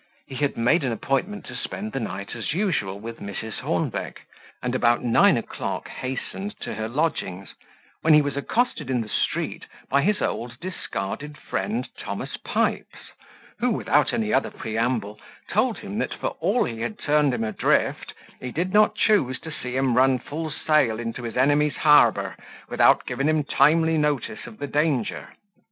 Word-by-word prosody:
He -, -, -11 dB
had 140 Hz, +2 st, -1 dB
made 125 Hz, +8 st, +3 dB
an 130 Hz, -, 0 dB
appointment 135 Hz, -, -1 dB
to -, -, -8 dB
spend 215 Hz, +3 st, -5 dB
the -, -, -2 dB
night, 100 Hz, -3 st, -5 dB
as 120 Hz, +6 st, -3 dB
usual, 155 Hz, -, -1 dB
with 115 Hz, +2 st, -7 dB
Mrs. 105 Hz, +2 st, -6 dB
Hornbeck; -, -, -2 dB, 0.4 s
and 125 Hz, 0 st, -1 dB
about 120 Hz, -2 st, +3 dB
nine 120 Hz, -2 st, +5 dB
o'clock -, -, -4 dB
hastened 160 Hz, +10 st, -5 dB
to -, -, -4 dB
her 110 Hz, 0 st, -3 dB
lodgings, 115 Hz, -, -2 dB, 0.5 s
when 160 Hz, -1 st, +6 dB
he 150 Hz, -, +7 dB
was 145 Hz, -1 st, -2 dB
accosted 225 Hz, -, -1 dB
in 125 Hz, -2 st, +1 dB
the 110 Hz, -, -6 dB
street -, -, -1 dB, 0.2 s
by 140 Hz, +1 st, +4 dB
his 205 Hz, +5 st, +2 dB
old 120 Hz, +1 st, -3 dB
discarded 145 Hz, -, -5 dB
friend 220 Hz, +4 st, -2 dB
Thomas -, -, -5 dB
Pipes, -, -, -2 dB, 0.5 s
who, 250 Hz, -, +2 dB
without 225 Hz, -, +2 dB
any 220 Hz, -2 st, 0 dB
other -, -, +2 dB
preamble, 110 Hz, -2 st, -2 dB, 0.3 s
told -, -, +1 dB
him, -, -, -5 dB
that -, -, -2 dB
for -, -, -2 dB
all -, -, +2 dB
he 115 Hz, -2 st, -4 dB
had 210 Hz, -, -3 dB
turned 150 Hz, -1 st, +2 dB
him 125 Hz, -, -1 dB
adrift, 110 Hz, -, 0 dB, 0.2 s
he 125 Hz, -, -5 dB
did 180 Hz, +6 st, -2 dB
not 210 Hz, 0 st, +5 dB
choose 170 Hz, -, +2 dB
to 160 Hz, -, -7 dB
see 125 Hz, -4 st, -5 dB
him 130 Hz, -3 st, +2 dB
run 130 Hz, +1 st, +5 dB
full 155 Hz, +5 st, -5 dB
sail 150 Hz, -6 st, +2 dB
into 115 Hz, +1 st, -4 dB
his 115 Hz, -1 st, -5 dB
enemy's 145 Hz, +3 st, +3 dB
harbour, 150 Hz, -1 st, +4 dB, 0.3 s
without -, -, +4 dB
giving 135 Hz, +4 st, 0 dB
him 155 Hz, -1 st, +2 dB
timely 160 Hz, +2 st, +3 dB
notice 150 Hz, -, -1 dB
of 225 Hz, -2 st, -11 dB
the 145 Hz, -, -4 dB
danger. 145 Hz, -4 st, 0 dB
140 Hz, 170 wpm, -24 LUFS, 120-160 Hz, 0.5 s, he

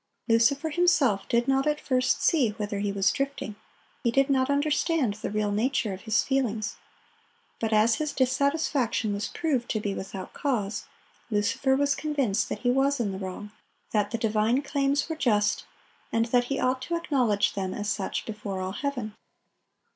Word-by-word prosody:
Lucifer 265 Hz, +7 st, +3 dB
himself 290 Hz, -, +2 dB
did 235 Hz, +1 st, +2 dB
not 270 Hz, +1 st, +2 dB
at 300 Hz, 0 st, +1 dB
first 255 Hz, -1 st, +1 dB
see 285 Hz, -9 st, +3 dB
whither 205 Hz, -2 st, -3 dB
he 200 Hz, 0 st, -1 dB
was 195 Hz, -1 st, +2 dB
drifting; 275 Hz, -6 st, -3 dB, 0.5 s
he 235 Hz, -, +3 dB
did 275 Hz, +4 st, +2 dB
not 260 Hz, 0 st, +2 dB
understand 290 Hz, -, +1 dB
the 210 Hz, -, -5 dB
real 210 Hz, 0 st, 0 dB
nature 220 Hz, 0 st, 0 dB
of 185 Hz, -, -8 dB
his 220 Hz, +2 st, +2 dB
feelings. 225 Hz, -6 st, -1 dB, 0.8 s
But 225 Hz, -1 st, -1 dB
as 220 Hz, +1 st, +4 dB
his 305 Hz, -1 st, -2 dB
dissatisfaction 260 Hz, -4 st, +1 dB
was 200 Hz, +1 st, -2 dB
proved 275 Hz, -8 st, -1 dB
to 215 Hz, -, 0 dB
be 205 Hz, -1 st, -2 dB
without 190 Hz, -1 st, -7 dB
cause, 225 Hz, -8 st, -2 dB, 0.4 s
Lucifer 220 Hz, +5 st, +1 dB
was 285 Hz, +1 st, +2 dB
convinced 270 Hz, -9 st, 0 dB
that -, -, -4 dB
he 245 Hz, -, +2 dB
was 275 Hz, +2 st, +2 dB
in 215 Hz, -4 st, 0 dB
the 190 Hz, -, -5 dB
wrong, 190 Hz, +2 st, -6 dB, 0.4 s
that 210 Hz, -2 st, +1 dB
the 230 Hz, -, -2 dB
divine 225 Hz, +4 st, +1 dB
claims 280 Hz, 0 st, 0 dB
were 320 Hz, -, -3 dB
just, 210 Hz, -8 st, +1 dB, 0.5 s
and 230 Hz, 0 st, +2 dB
that 245 Hz, -1 st, +4 dB
he 275 Hz, +2 st, -2 dB
ought 255 Hz, 0 st, +1 dB
to 340 Hz, +6 st, -2 dB
acknowledge 250 Hz, -11 st, +1 dB
them 190 Hz, -2 st, -2 dB
as 205 Hz, +2 st, -4 dB
such 205 Hz, -2 st, -2 dB
before 210 Hz, -3 st, -5 dB
all 185 Hz, 0 st, -3 dB
heaven. 245 Hz, -2 st, -3 dB
240 Hz, 175 wpm, -27 LUFS, 210-275 Hz, 0.8 s, as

